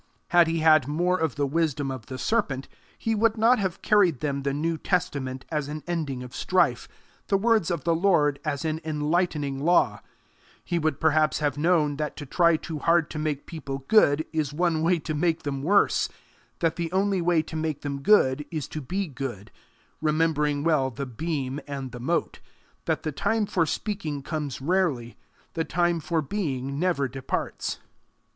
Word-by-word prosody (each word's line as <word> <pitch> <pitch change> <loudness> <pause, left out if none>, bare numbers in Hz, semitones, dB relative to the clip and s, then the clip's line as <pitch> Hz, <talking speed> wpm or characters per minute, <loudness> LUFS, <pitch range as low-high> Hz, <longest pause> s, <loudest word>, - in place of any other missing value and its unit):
Had 175 -1 +5
he 165 0 0
had 155 -4 +5
more 175 +5 +1
of 160 -6 -1
the 145 - 0
wisdom 145 -2 0
of 130 -4 -7
the 130 - -6
serpent, 135 - -1 0.3
he 225 - -1
would 225 +1 +2
not 230 +3 +4
have 190 -4 -3
carried 190 - +4
them 140 -2 -2
the 140 0 -1
New 160 +4 -1
Testament 130 -8 -2
as 150 -3 -1
an 150 +1 -6
ending 155 -7 -3
of 125 - -10
strife, 170 -10 +1 0.4
the 195 - +3
words 215 -3 +2
of 170 -6 -2
the 170 - +2
Lord 160 -5 +2
as 150 -1 -2
an 160 0 -1
enlightening 150 -2 -1
law; 175 +5 +2 0.6
he 175 -2 0
would 155 -1 0
perhaps 155 -1 +3
have 145 -2 0
known 150 -2 +2
that 150 0 -3
to 145 - -6
try 170 +3 +3
too 155 -1 -6
hard 165 +1 +2
to 155 - -4
make 150 -2 -2
people 135 -4 -6
good, 155 -8 +4
is 155 -3 0
one 165 +1 +1
way 170 +2 +3
to 155 0 -4
make 160 +2 0
them 140 -2 -3
worse; 200 +7 +3 0.5
that 165 -1 +1
the 170 -1 -2
only 195 0 +1
way 170 -2 +2
to 160 - -9
make 155 -2 -2
them 140 -1 -4
good 150 -7 +4
is 155 -6 -4
to 155 - -5
be 190 +9 -2
good 125 -8 -6 0.5
remembering 150 -2 +1
well 155 -5 +2
the 135 +3 -5
beam 135 +1 -3
and 135 -2 -5
the 125 - -8
mote; 165 +8 -1 0.5
that - - -1
the 155 - -2
time 210 +8 0
for 170 -5 +1
speaking 160 -11 -3
comes 150 -4 -4
rarely, 145 -8 0 0.4
the 165 - -1
time 175 0 +1
for 160 0 -1
being 140 -5 -3
never 170 -6 +1
departs. 130 0 -3
155 Hz, 180 wpm, -26 LUFS, 140-175 Hz, 0.6 s, Had